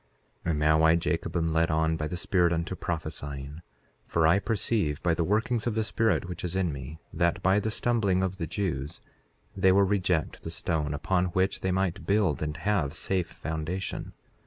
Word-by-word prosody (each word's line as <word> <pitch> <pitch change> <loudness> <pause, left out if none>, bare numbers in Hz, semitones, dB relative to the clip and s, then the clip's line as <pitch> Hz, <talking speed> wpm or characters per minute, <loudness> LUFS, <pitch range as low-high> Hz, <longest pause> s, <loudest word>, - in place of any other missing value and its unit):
4:15 - - 0
And 75 -3 +1
now 80 +1 +4
I, 80 +1 +6
Jacob, 85 +1 -1
am 80 -1 0
led 80 +1 +2
on 80 0 +2
by 75 -1 -2
the 90 - -4
Spirit 90 -1 +2
unto 85 +2 -1
prophesying; 75 -3 -5 0.5
for 85 -1 +2
I 85 +5 +5
perceive 100 -6 0
by 85 - +3
the 85 - 0
workings 110 +5 0
of 115 - -1
the 110 - +1
Spirit 110 -2 +1
which 90 - -6
is 90 0 -3
in 90 -5 0
me, 70 +3 -7 0.2
that 85 0 +1
by 95 +3 +4
the 110 - -2
stumbling 105 -5 +1
of 95 0 -2
the 80 - -3
Jews 80 -7 -3 0.6
they 95 -1 +4
will 100 +1 +5
reject 90 -5 0
the - - -6
stone 80 -3 -1
upon 90 +5 +1
which 95 +1 +1
they 95 - 0
might 95 -2 -1
build 100 -6 +2
and 75 -1 -3
have 90 -9 0
safe 90 +1 0
foundation. 80 +4 -4
85 Hz, 195 wpm, -28 LUFS, 80-95 Hz, 0.6 s, I